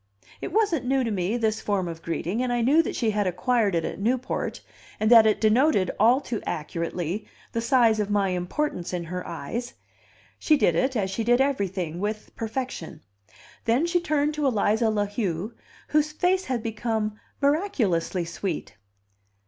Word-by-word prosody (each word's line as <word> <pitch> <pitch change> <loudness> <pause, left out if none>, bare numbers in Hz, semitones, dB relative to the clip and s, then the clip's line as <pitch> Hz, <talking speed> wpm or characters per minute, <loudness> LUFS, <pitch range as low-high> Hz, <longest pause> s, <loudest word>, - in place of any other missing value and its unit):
It - - -4
wasn't 365 - +1
new 265 0 +2
to 230 - -1
me, 195 +3 0
this 220 -2 0
form 195 -3 -1
of 165 -1 -6
greeting, 175 +7 -2
and 255 -1 0
I 240 0 +1
knew 280 +8 +5
that - - -4
she 225 -3 +1
had 205 -2 0
acquired 200 +2 +1
it 165 - 0
at - - -5
Newport, 245 +5 -1 0.4
and 215 +2 +2
that 225 -2 +9
it 215 - +2
denoted, 220 -2 +3
all 235 +5 +5
too 240 -6 -4
accurately, 170 +4 -3 0.2
the 230 - -1
size 235 -3 +4
of 210 -1 -1
my 200 -2 +2
importance 180 - -2
in 175 -1 -2
her 180 +2 -5
eyes; 200 +10 -5 0.6
she 305 - +4
did 175 - +3
it, 260 +11 +1
as 195 -4 0
she 225 +4 -2
did 240 +2 +3
everything, 190 - -1
with 210 +2 -4
perfection. 225 - -5 0.6
Then 240 +8 +3
she 345 +1 +2
turned 305 -3 0
to 300 -2 0
Eliza 220 -1 +2
La 210 -1 +1
Heu, 205 -1 -3 0.4
whose 305 0 +2
face 365 +4 +1
had 245 -4 -2
become 220 -1 -2 0.2
miraculously 230 - +1
sweet. 170 0 -4
220 Hz, 175 wpm, -25 LUFS, 185-260 Hz, 0.6 s, that